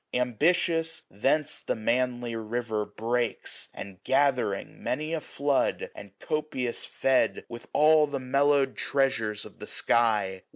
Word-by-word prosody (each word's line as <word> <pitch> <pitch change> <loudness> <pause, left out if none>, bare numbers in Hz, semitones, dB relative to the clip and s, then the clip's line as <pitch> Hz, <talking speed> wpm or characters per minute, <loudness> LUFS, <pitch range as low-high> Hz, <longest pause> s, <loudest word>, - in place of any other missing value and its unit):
Ambitious, 165 - +1
thence 140 +9 0
the - - -2
manly 120 +1 0
river 110 -1 -2
breaks; 120 +1 -2
And 95 -2 -10
gathering 130 -8 +1
many 155 +5 -2
a 160 - -1
flood, 140 -1 0
and 100 -1 -12
copious 140 -6 -2
fed 135 -1 +1
With 120 0 -9
all 155 0 +5
the 140 -1 -3
mellowed 140 +1 +2
treasures 115 -7 0
of - - -14
the - - -8
sky. 105 -5 +1
125 Hz, 125 wpm, -28 LUFS, 115-145 Hz, -, all